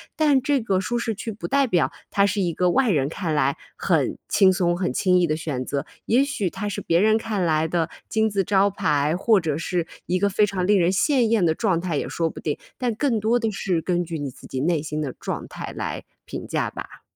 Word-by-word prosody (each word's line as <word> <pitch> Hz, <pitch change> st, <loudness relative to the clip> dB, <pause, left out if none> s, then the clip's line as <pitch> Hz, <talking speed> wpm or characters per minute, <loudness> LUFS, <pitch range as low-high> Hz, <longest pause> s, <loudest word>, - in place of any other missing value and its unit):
但 295 Hz, -4 st, +3 dB
这 280 Hz, +1 st, +1 dB
个 195 Hz, -4 st, +1 dB
舒 195 Hz, +6 st, -2 dB
适 230 Hz, -1 st, -1 dB
区 225 Hz, +2 st, -5 dB
不 210 Hz, -, -6 dB
代 275 Hz, -1 st, +2 dB
表 175 Hz, -7 st, +2 dB, 0.2 s
它 200 Hz, -, +3 dB
是 200 Hz, 0 st, 0 dB
一 175 Hz, -3 st, 0 dB
个 180 Hz, +2 st, +2 dB
外 260 Hz, -3 st, +3 dB
人 140 Hz, -4 st, +1 dB
看 165 Hz, -2 st, -3 dB
来 140 Hz, -1 st, +1 dB, 0.2 s
很 -, -, +1 dB
轻 190 Hz, -1 st, +5 dB
松、 175 Hz, -2 st, +1 dB
很 180 Hz, -, -1 dB
轻 180 Hz, +3 st, +3 dB
易 175 Hz, -, +2 dB
的 155 Hz, -, 0 dB
选 135 Hz, -6 st, -3 dB
择， 140 Hz, -1 st, -2 dB, 0.2 s
也 245 Hz, +5 st, +4 dB
许 270 Hz, -, -1 dB
它 205 Hz, +4 st, -5 dB
是 205 Hz, -, -4 dB
别 170 Hz, +1 st, +2 dB
人 215 Hz, +2 st, +4 dB
看 215 Hz, -4 st, -2 dB
来 160 Hz, -1 st, +2 dB
的 165 Hz, -1 st, 0 dB, 0.2 s
金 220 Hz, 0 st, +2 dB
字 200 Hz, -2 st, 0 dB
招 200 Hz, +1 st, +3 dB
牌， 150 Hz, -5 st, +1 dB
或 215 Hz, 0 st, +4 dB
者 155 Hz, -4 st, -2 dB
是 170 Hz, 0 st, -2 dB, 0.2 s
一 185 Hz, -, 0 dB
个 200 Hz, +1 st, +2 dB
非 205 Hz, +2 st, +3 dB
常 185 Hz, -2 st, -2 dB
令 205 Hz, -1 st, +4 dB
人 175 Hz, 0 st, +3 dB
羡 255 Hz, +7 st, +2 dB
艳 220 Hz, -5 st, +2 dB
的 160 Hz, -, +3 dB
状 190 Hz, -7 st, +1 dB
态 170 Hz, -5 st, -2 dB
也 -, -, -2 dB
说 165 Hz, -1 st, -1 dB
不 -, -, -9 dB
定， 150 Hz, -, -2 dB, 0.2 s
但 245 Hz, -3 st, -1 dB
更 245 Hz, -3 st, +1 dB
多 225 Hz, +3 st, +2 dB
的 225 Hz, -2 st, -1 dB
是 185 Hz, -4 st, -1 dB
根 175 Hz, 0 st, 0 dB
据 165 Hz, -1 st, -5 dB
你 145 Hz, -2 st, -4 dB
自 -, -, -14 dB
己 130 Hz, -, -4 dB
内 160 Hz, -1 st, +1 dB
心 155 Hz, 0 st, -4 dB
的 140 Hz, -4 st, -3 dB
状 -, -, -5 dB
态 -, -, -7 dB
来 -, -, -4 dB, 0.2 s
评 -, -, -7 dB
价 -, -, -1 dB
吧。 -, -, -9 dB
185 Hz, 265 characters per minute, -23 LUFS, 165-220 Hz, 0.2 s, 轻